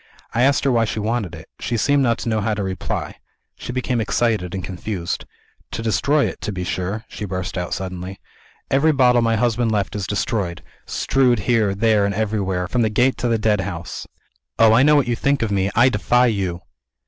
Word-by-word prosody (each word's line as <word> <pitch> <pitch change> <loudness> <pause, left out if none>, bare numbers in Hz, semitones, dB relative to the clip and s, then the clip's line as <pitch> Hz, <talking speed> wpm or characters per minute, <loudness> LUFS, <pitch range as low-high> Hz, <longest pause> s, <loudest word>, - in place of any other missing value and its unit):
I 120 - +1
asked 140 +2 +3
her 140 - +2
why 115 -2 +3
she 110 - -3
wanted 105 -5 -2
it. 80 - -12
She 120 - -2
seemed 145 +5 +2
not 120 -3 +2
to 115 - -3
know 110 -1 0
how 110 +1 0
to 100 - -2
reply; 95 -1 -4 0.4
she - - -7
became 125 -1 -1
excited 105 -4 0
and 95 - -4
confused. 90 -1 -4 0.4
'To 115 - -5
destroy 140 +6 +2
it, - - -5
to 105 - -3
be 90 -2 -4
sure!' 95 +5 -3
she - - -8
burst 95 -2 -4
out 90 -2 -3
suddenly. 95 0 -6 0.5
'Every 145 +4 +4
bottle 125 -3 +4
my 115 -1 +2
husband 120 0 +1
left 105 -2 -1
is 100 -3 -3
destroyed 100 -4 -2 0.2
strewed 125 -5 +2
here, 105 -2 +1
there, 110 0 +3
and 100 0 0
everywhere, 100 -4 -1
from 125 +6 0
the 110 - +2
Gate 125 +5 +2
to 125 - -1
the 115 -1 +2
Deadhouse. 100 -5 -2 0.5
Oh, 110 -1 +6
I 115 - +5
know 150 +2 +5
what 145 -4 +3
you 120 - +1
think 140 +2 +1
of 110 - -1
me 95 -1 +1
I 120 +3 +6
defy 125 +2 +2
you!' 95 -7 -1
110 Hz, 205 wpm, -21 LUFS, 95-120 Hz, 0.5 s, Oh